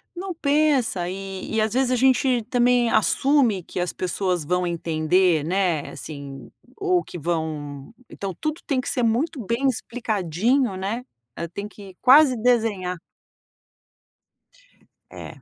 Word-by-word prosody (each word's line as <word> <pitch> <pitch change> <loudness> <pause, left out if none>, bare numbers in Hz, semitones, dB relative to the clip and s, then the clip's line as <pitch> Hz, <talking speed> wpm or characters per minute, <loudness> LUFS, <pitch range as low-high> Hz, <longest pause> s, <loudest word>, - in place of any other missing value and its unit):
Não 370 +1 -5
pensa 280 - +1
e 195 +2 -6
e, 220 - +2
às 215 0 0
vezes, 260 0 +1
a - - +3
gente 255 -1 +3
também 245 -1 +3
assume 235 -3 +2
que - - -6
as 175 0 -2
pessoas 180 -1 -1
vão 180 +4 0
entender, 170 0 +1
né, 175 -2 0
assim, 140 -3 -9 0.3
ou 370 -4 +1
que - - -9
vão 155 -2 -4 0.2
então 195 -1 -5
tudo 310 +2 -3
tem 270 -4 0
que - - -4
ser 250 - 0
muito 250 +5 0
bem 235 +6 0
explicadinho 230 - 0
né, 200 +6 -3 0.5
tem 200 +2 -5
que 200 -3 -13
quase 265 0 +7
desenhar. 215 -7 +1 2.1
É. - - -10
215 Hz, 130 wpm, -23 LUFS, 180-255 Hz, 2.1 s, quase